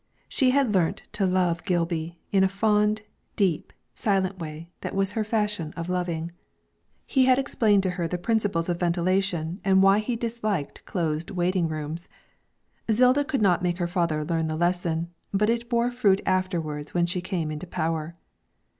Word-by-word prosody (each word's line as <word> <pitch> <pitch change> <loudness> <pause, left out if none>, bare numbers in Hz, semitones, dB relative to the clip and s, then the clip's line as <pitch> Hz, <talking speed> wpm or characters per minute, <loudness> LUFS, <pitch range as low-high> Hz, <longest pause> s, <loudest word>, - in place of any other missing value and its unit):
She 260 -3 +2
had 260 -4 +2
learnt 175 -4 +1
to 195 -3 0
love 180 -2 +2
little 175 - -21 0.2
Gilby 165 0 -4
in 195 -1 +4
a - - +5
fond, 210 +1 +2 0.3
deep, 185 -7 0 0.2
silent 190 -2 0
way 160 +1 -7
that - - -5
was 195 0 +1
her 220 - -1
fashion 210 -7 -1
of 170 +1 -4
loving. 170 -2 -2 0.7
He 265 -2 +3
had 255 0 +5
explained 215 -7 +2
to 185 - +1
her 175 -2 -2
the 180 - -2
principles 200 -4 0
of 175 -1 -1
ventilation 175 0 0
and 190 0 +4
why 195 +1 +6
he 235 +3 -2
disliked 225 -8 -3
close 165 -3 -2
waiting 180 -1 +1
rooms. 155 +2 -5 0.8
Zilda 250 +5 +4
could 280 -6 -1
not 180 -3 +3
make 175 -1 0
her 175 - -1
father 170 -3 0
learn 165 0 0
the 155 - -2
lesson, 170 0 0 0.2
but 210 +3 +2
it 235 0 -2
bore 235 0 +2
fruit 205 -6 +3
afterwards 170 -6 -1
when 175 -1 +3
she 175 +1 -2
came 175 -5 -2
into 155 +4 -6
power. 165 -1 -2
185 Hz, 170 wpm, -26 LUFS, 170-210 Hz, 0.8 s, why